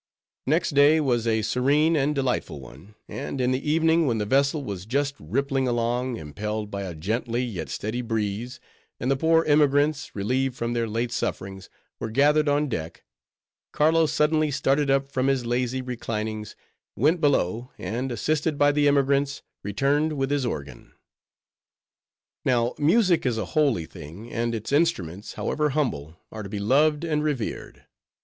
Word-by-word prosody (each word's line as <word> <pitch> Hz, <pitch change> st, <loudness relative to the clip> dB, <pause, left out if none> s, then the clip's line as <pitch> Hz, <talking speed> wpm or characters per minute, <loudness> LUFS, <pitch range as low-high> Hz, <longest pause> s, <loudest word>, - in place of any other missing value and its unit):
Next 165 Hz, +4 st, +2 dB
day 145 Hz, +2 st, +5 dB
was 120 Hz, -6 st, +1 dB
a 110 Hz, -1 st, +1 dB
serene 140 Hz, +8 st, +2 dB
and 150 Hz, 0 st, +1 dB
delightful 130 Hz, -, -1 dB
one; 70 Hz, -, -14 dB
and 135 Hz, -, -5 dB
in 125 Hz, 0 st, +2 dB
the 135 Hz, +3 st, -1 dB
evening 160 Hz, 0 st, +3 dB
when 115 Hz, -3 st, +1 dB
the 105 Hz, -, -1 dB
vessel 140 Hz, +5 st, +2 dB
was 100 Hz, -5 st, -6 dB
just 140 Hz, +3 st, 0 dB
rippling 135 Hz, -, -1 dB
along 120 Hz, +1 st, -1 dB
impelled 105 Hz, +7 st, -5 dB
by 100 Hz, -, -4 dB
a 90 Hz, -4 st, -5 dB
gentle 115 Hz, +8 st, -2 dB
yet 105 Hz, -, -3 dB
steady 110 Hz, -, -3 dB
breeze, 115 Hz, +2 st, -3 dB, 0.4 s
and 130 Hz, -, 0 dB
the -, -, +3 dB
poor 160 Hz, +4 st, +3 dB
emigrants, 145 Hz, 0 st, +2 dB
relieved 125 Hz, +6 st, 0 dB
from 115 Hz, -1 st, -2 dB
their 115 Hz, -1 st, 0 dB
late 115 Hz, +2 st, -2 dB
sufferings, 95 Hz, -5 st, -4 dB, 0.3 s
were 115 Hz, -, -4 dB
gathered 145 Hz, +5 st, +3 dB
on 145 Hz, +1 st, +2 dB
deck; 80 Hz, -, -5 dB, 0.7 s
Carlo 160 Hz, +1 st, +3 dB
suddenly 155 Hz, 0 st, +2 dB
started 140 Hz, +1 st, +1 dB
up 135 Hz, 0 st, +1 dB
from 130 Hz, 0 st, 0 dB
his 135 Hz, -3 st, +1 dB
lazy 125 Hz, +2 st, -1 dB
reclinings; 110 Hz, -3 st, -4 dB, 0.4 s
went 155 Hz, -, +2 dB
below, 125 Hz, -, +1 dB
and, 125 Hz, +4 st, -3 dB
assisted 150 Hz, +6 st, -1 dB
by 145 Hz, 0 st, +4 dB
the 145 Hz, 0 st, +2 dB
emigrants, 140 Hz, 0 st, +2 dB, 0.2 s
returned 140 Hz, +9 st, +1 dB
with 135 Hz, -1 st, -1 dB
his 140 Hz, -3 st, +1 dB
organ. 70 Hz, -, -7 dB, 1.5 s
Now, 120 Hz, -2 st, +1 dB
music 175 Hz, +3 st, +3 dB
is 120 Hz, -3 st, 0 dB
a 110 Hz, -, -2 dB
holy 140 Hz, -, +2 dB
thing, 85 Hz, +11 st, -11 dB
and 115 Hz, 0 st, -1 dB
its 110 Hz, +2 st, -5 dB
instruments, 105 Hz, -, 0 dB
however 150 Hz, 0 st, -1 dB
humble, 80 Hz, -, -2 dB
are 110 Hz, -, -6 dB
to 100 Hz, -, -7 dB
be 105 Hz, -, -4 dB
loved 145 Hz, +9 st, +2 dB
and 150 Hz, -2 st, 0 dB
revered. 145 Hz, -7 st, -4 dB
130 Hz, 160 wpm, -25 LUFS, 110-145 Hz, 1.5 s, day